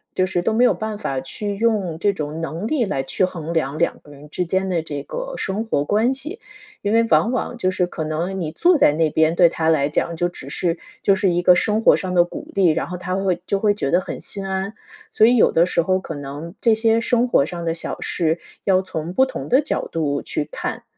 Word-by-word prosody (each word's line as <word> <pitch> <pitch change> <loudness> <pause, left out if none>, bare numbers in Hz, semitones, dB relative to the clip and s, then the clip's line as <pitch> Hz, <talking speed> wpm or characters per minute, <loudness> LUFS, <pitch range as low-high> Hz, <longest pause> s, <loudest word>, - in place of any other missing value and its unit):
就 185 - +2
是 185 -1 -1
都 220 - 0
没 235 +3 +3
有 250 - +5
办 215 -1 -4
法 135 -10 -3
去 200 +9 -5
用 200 -7 0
这 200 +2 +2
种 155 -2 -5
能 165 +5 -4
力 260 -3 +1
来 135 -10 -2
去 135 +7 0
衡 170 -3 -5
量 150 -3 -1
两 170 - 0
个 145 - -17
人 145 +1 -14
之 180 +4 -2
间 190 +2 -1
的 175 -3 0
这 145 -3 -6
个 - - -6
生 210 - -3
活 145 -10 0
关 220 - +2
系。 305 +10 -4 0.4
因 205 +1 -1
为 230 - +5
往 230 +2 +3
往 245 -1 -2
就 185 -6 0
是 185 -1 0
可 160 -3 -5
能 170 +5 -2
你 155 -3 -3
坐 350 - +4
在 150 - +5
那 160 0 +2
边， 160 +2 +2
对 175 -1 +6
他 160 -1 -2
来 150 -3 +3
讲 170 +2 -1
就 175 +2 0
只 175 - -10
是 170 -1 -1 0.3
就 195 - +4
是 190 0 +2
一 175 - +1
个 180 0 +6
生 210 +5 +1
活 - - +5
上 185 -1 -4
的 175 - +6
鼓 175 - -8
励， 190 -3 +4
然 155 - 0
后 180 - -5
他 180 +1 -4
会 185 -3 0
就 200 - 0
会 205 0 +3
觉 170 -9 -2
得 175 - +4
很 - - -6
心 195 -1 -5
安。 190 +2 -3 0.4
所 220 - +5
以 245 - +4
有 230 - +5
的 165 - +4
时 175 -1 +1
候 185 +2 +1
可 165 - -7
能 145 +6 -7
这 230 - +4
些 225 +1 +2
生 245 +1 +2
活 140 - +3
上 170 +1 -6
的 165 - 0
小 165 - -5
事， 165 -1 -1 0.2
要 190 -1 +3
从 165 -2 -5
不 260 +8 +4
同 260 - -6
的 260 - +5
角 300 - -2
度 145 -3 -1
去 150 - -3
看。 - - -5
180 Hz, 270 characters per minute, -21 LUFS, 160-210 Hz, 0.4 s, 对